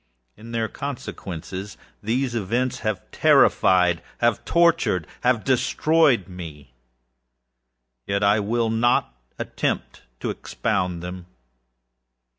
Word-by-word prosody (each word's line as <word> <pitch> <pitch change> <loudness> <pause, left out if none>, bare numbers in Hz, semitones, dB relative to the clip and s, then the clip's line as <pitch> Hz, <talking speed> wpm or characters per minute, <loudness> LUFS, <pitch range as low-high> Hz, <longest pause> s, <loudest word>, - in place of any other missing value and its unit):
In 115 +2 -12
their 115 -1 -1
consequences, 100 - -6 0.2
these 120 +4 -1
events 120 +4 -1
have 110 -4 -2
terrifiedâhave 90 -1 +4 0.3
torturedâhave 120 - +1
destroyed 135 - +2
me. 80 -8 -10 1.3
Yet 100 +1 0
I 100 +1 +4
will 115 +2 0
not 115 - +2 0.2
attempt - - -3 0.2
to - - -1
expound 90 -2 -2
them. 90 0 -7
110 Hz, 85 wpm, -23 LUFS, 90-120 Hz, 1.3 s, terrifiedâhave